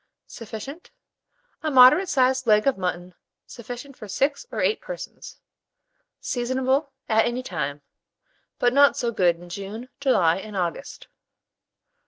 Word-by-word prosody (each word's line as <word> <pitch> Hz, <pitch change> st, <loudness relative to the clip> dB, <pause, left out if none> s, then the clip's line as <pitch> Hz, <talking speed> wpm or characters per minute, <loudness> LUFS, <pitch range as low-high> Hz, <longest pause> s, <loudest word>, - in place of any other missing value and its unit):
Sufficient. 230 Hz, -, -9 dB, 0.7 s
A 315 Hz, -, -1 dB
moderate 265 Hz, +8 st, +7 dB
sized 260 Hz, -3 st, +2 dB
leg 210 Hz, -1 st, +4 dB
of 275 Hz, -, +3 dB
mutton 180 Hz, -1 st, -4 dB, 0.3 s
sufficient 245 Hz, +3 st, -9 dB
for 215 Hz, -, -10 dB
6 280 Hz, -, -1 dB
or -, -, -4 dB
8 435 Hz, -, +1 dB
persons. -, -, -9 dB, 0.8 s
Seasonable 260 Hz, +3 st, -1 dB, 0.2 s
at 220 Hz, 0 st, +3 dB
any 245 Hz, +2 st, -3 dB
time, 145 Hz, -, -4 dB, 0.7 s
but 245 Hz, 0 st, +2 dB
not 280 Hz, +1 st, +5 dB
so 235 Hz, -, -1 dB
good 180 Hz, -6 st, +2 dB
in 175 Hz, +1 st, -14 dB
June, 200 Hz, +7 st, -7 dB
July, 185 Hz, -12 st, +3 dB
and 205 Hz, +1 st, -7 dB
August. 180 Hz, +9 st, -4 dB
240 Hz, 130 wpm, -24 LUFS, 195-270 Hz, 0.8 s, moderate